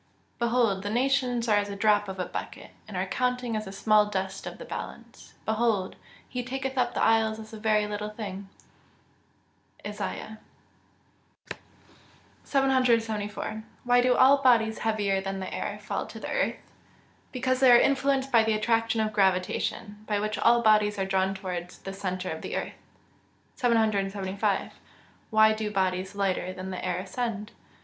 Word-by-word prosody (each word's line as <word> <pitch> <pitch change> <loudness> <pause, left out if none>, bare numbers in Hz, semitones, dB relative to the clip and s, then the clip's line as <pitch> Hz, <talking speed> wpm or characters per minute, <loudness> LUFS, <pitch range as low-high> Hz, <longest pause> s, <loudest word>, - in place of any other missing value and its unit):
[Verse: 235 0 +1
"Behold, 230 -5 +2
the 205 - -4
nations 245 0 +1
are 210 -2 +4
as 205 0 0
a 200 - -5
drop 205 0 +3
of 190 -1 -6
a 180 - -1
bucket, - - -7 0.2
and - - -6
are - - 0
counted 250 -2 -1
as 215 0 -3
the 195 - -7
small 210 +1 +3
dust 190 -2 -4
of - - -7
the - - -9
balance: - - -9
behold, 220 -4 0 0.3
he 250 - -4
taketh 265 +1 -4
up 245 -2 0
the - - +1
isles 220 -1 +3
as 220 0 -11
a 220 - -7
very 215 -1 +2
little 210 0 -4
thing." 200 -3 -7 1.4
ISAIAH 210 +1 -5 1.1
XL.] - - -20 0.9
774. 230 -6 +1 0.2
Why 245 0 +4
do 250 0 +3
all 275 +2 +6
bodies 225 -4 +3
heavier 205 -3 0
than 195 0 -4
the 190 - -5
air - - -3
fall - - -4
to - - -9
the - - -6
earth? - - -2 0.6
Because 255 0 0
they 260 -2 +7
are 240 - +9
influenced 270 0 +2
by 230 -2 +6
the 220 0 +1
attraction 225 +1 +1
of 215 0 -1
gravitation, 195 +2 0
by 210 -1 0
which 215 0 -2
all 235 0 +4
bodies 210 -1 +4
are 195 - 0
drawn 190 0 0
towards 180 -2 -5
the 195 - -7
centre 185 -2 -3
of 160 - -5
the - - -5
earth. - - -3 0.8
775. 200 -5 0 0.6
_Why 220 0 +5
do 215 -1 -3
bodies 190 -1 -1
lighter 190 -2 -1
than 185 0 -6
the 185 - -5
air 180 -1 -1
ascend? 210 +2 -4
215 Hz, 165 wpm, -27 LUFS, 195-235 Hz, 1.4 s, are